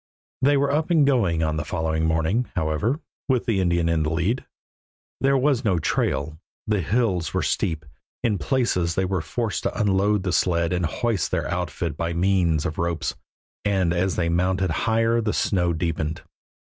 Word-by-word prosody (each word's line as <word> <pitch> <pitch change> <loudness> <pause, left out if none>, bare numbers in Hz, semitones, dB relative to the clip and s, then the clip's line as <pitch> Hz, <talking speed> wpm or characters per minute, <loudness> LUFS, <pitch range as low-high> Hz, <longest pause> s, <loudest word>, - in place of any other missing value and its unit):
They 145 +2 +4
were 140 0 +2
up 155 +4 0
and 160 -5 +4
going 100 - +2
on 80 0 0
the 75 - -1
following 80 +1 -1
morning, 80 +9 +1
however, 85 - 0 0.3
with 130 -3 +2
the 105 -5 +1
Indian 85 -2 +1
in 85 -1 +1
the 75 - 0
lead. 85 +10 -1 0.7
There 135 0 +3
was 135 -1 +2
no 100 -6 +2
trail; 80 -1 -1 0.3
the 105 -3 +1
hills 90 -5 0
were - - +1
steep; 80 -2 -1 0.4
in 105 -5 +1
places 90 -11 0
they 95 - +1
were 95 -2 -1
forced 105 +7 -2
to - - -3
unload 100 -1 +2
the 90 -2 -1
sled 85 -1 +1
and 90 -2 0
hoist 115 +2 -1
their - - -1
outfit 80 -4 -3
by 85 0 -2
means 85 -3 +2
of 80 - -3
ropes, 85 -2 -1 0.5
and 95 -4 +1
as 90 +2 0
they 85 - 0
mounted 90 +2 +1
higher 115 +1 +1
the 105 -1 -1
snow 90 -3 +1
deepened. 80 -1 -2
90 Hz, 175 wpm, -24 LUFS, 80-115 Hz, 0.7 s, They